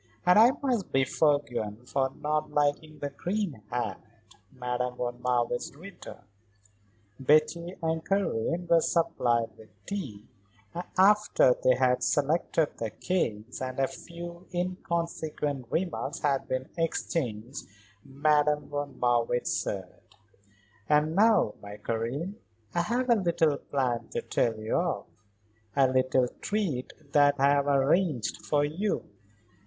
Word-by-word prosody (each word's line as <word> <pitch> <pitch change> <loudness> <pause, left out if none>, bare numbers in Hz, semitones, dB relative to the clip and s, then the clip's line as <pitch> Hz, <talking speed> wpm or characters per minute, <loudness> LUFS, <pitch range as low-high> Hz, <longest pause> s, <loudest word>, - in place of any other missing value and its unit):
"And 180 +3 +6
I 230 +2 +8
must 245 -8 0
be 135 - +3
forgiven 125 -6 0
for 135 +1 0
not 150 +1 -1
liking 150 +1 0
the 145 -1 -4
green 175 - -3
hat," 120 +1 -3 0.5
Madame 125 -1 -3
von 120 0 -4
Marwitz 120 +1 0
returned. 180 - -11 0.9
Betty 155 +6 +2
and 160 0 0
Karen 175 - 0
were 170 -1 +5
supplied 125 -11 +1
with 110 - -14 0.2
tea, 135 - -5 0.5
and 175 +1 -4
after 205 -8 +5
they 130 - +5
had 125 -1 +2
selected 155 +1 +1
their 115 - -2
cakes, 120 - -2
and 130 0 -4
a 135 - +4
few 170 +2 -9
inconsequent 170 -6 -2
remarks 175 -1 -2
had 140 -2 +1
been 130 +1 -2
exchanged, 130 -7 -2 0.4
Madame 150 +1 +1
von 145 -1 -4
Marwitz 120 0 +1
said: 95 -3 -4 0.9
"And 150 +2 +3
now, 210 - +4
my 100 0 -9
Karen, 120 - -3 0.4
I 170 - +2
have 240 +8 0
a 240 - +5
little 165 -6 +2
plan 125 -4 -1
to - - -2
tell 115 -2 0
you 110 +1 -1
of; 175 0 -1 0.7
a 135 -1 +5
little 130 0 +2
treat 185 -12 -1 0.2
that 145 -1 +5
I 140 +1 +5
have 140 0 +2
arranged 140 - +1
for 145 -1 +2
you. 180 +8 -2
145 Hz, 125 wpm, -28 LUFS, 125-170 Hz, 0.9 s, I